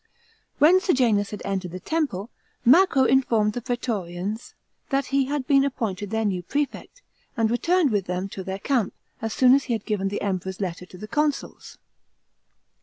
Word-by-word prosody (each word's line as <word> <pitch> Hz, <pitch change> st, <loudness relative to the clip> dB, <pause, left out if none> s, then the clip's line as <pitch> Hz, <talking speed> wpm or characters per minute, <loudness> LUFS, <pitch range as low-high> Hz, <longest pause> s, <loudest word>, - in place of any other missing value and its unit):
When 330 Hz, +6 st, +6 dB
Sejanus 235 Hz, -, +2 dB
hao 210 Hz, -, -5 dB
entered 195 Hz, -2 st, -2 dB
the 180 Hz, +2 st, -7 dB
temple, 245 Hz, -, -2 dB, 0.3 s
Macro 275 Hz, +1 st, +6 dB
informed 235 Hz, -5 st, +3 dB
the 245 Hz, -, -4 dB
praetorians 210 Hz, -4 st, -4 dB, 0.3 s
that 275 Hz, 0 st, +1 dB
he 275 Hz, -1 st, +3 dB
had 285 Hz, -1 st, -2 dB
been 275 Hz, -1 st, +4 dB
appointed 210 Hz, -7 st, -3 dB
their 220 Hz, +1 st, -1 dB
new 190 Hz, -3 st, 0 dB
prefect, 290 Hz, -, -4 dB, 0.3 s
and 225 Hz, -1 st, +2 dB
returned 335 Hz, +4 st, +2 dB
with 200 Hz, -3 st, 0 dB
them 180 Hz, +2 st, -2 dB
to 190 Hz, -, -7 dB
their 190 Hz, +1 st, -4 dB
camp, 240 Hz, -1 st, 0 dB, 0.3 s
as 225 Hz, 0 st, -2 dB
soon 255 Hz, +2 st, +5 dB
as 275 Hz, 0 st, +3 dB
he 245 Hz, -, -1 dB
had 220 Hz, -2 st, -3 dB
given 205 Hz, -3 st, -1 dB
the 205 Hz, -, -3 dB
Emperor's 190 Hz, -2 st, -3 dB
letter 180 Hz, -2 st, -4 dB
to 180 Hz, -, -13 dB
the 215 Hz, -, -8 dB
consuls. 295 Hz, +4 st, -2 dB
225 Hz, 175 wpm, -24 LUFS, 195-275 Hz, 0.3 s, When